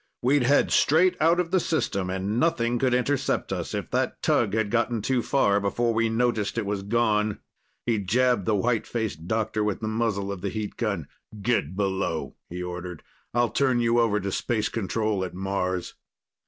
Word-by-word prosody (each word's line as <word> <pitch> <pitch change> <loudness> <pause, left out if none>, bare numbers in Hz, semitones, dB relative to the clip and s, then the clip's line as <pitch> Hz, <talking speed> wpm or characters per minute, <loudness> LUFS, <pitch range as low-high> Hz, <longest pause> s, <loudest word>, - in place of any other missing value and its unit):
We'd 140 +3 +4
head 140 +4 +3
straight 180 +5 +4
out 165 +3 +4
of 175 -1 -1
the 185 - +4
system, 130 - -1
and 95 +4 -1
nothing 120 -6 +1
could 125 -1 +2
intercept 135 +2 0
us, - - -4
if - - -4
that - - -1
tug - - +2
had 110 -2 0
gotten 115 -2 0
too 130 0 +1
far 100 -6 +2
before 115 +4 0
we 115 0 +1
noticed 115 -2 0
it 115 - 0
was 100 0 -2
gone." 105 0 +1 0.5
He 115 -3 +1
jabbed 120 +1 +2
the 110 - +3
white 115 +2 0
faced 110 -8 -3
doctor 110 0 0
with 105 -2 -1
the 110 - -3
muzzle 110 -3 -1
of 100 -3 -6
the 100 - -2
heat 105 0 -4
gun. - - -2 0.3
"Get 100 -7 0
below," 95 -4 -1 0.2
he 90 +1 -5
ordered. 90 -1 -6 0.3
"I'll 120 -1 +3
turn 130 -3 +2
you 120 0 +3
over 110 -3 +2
to 100 0 -3
Space 110 +2 -1
Control 105 -1 -1
at 90 -1 -5
Mars." 95 -2 -2
110 Hz, 185 wpm, -26 LUFS, 100-120 Hz, 0.5 s, We'd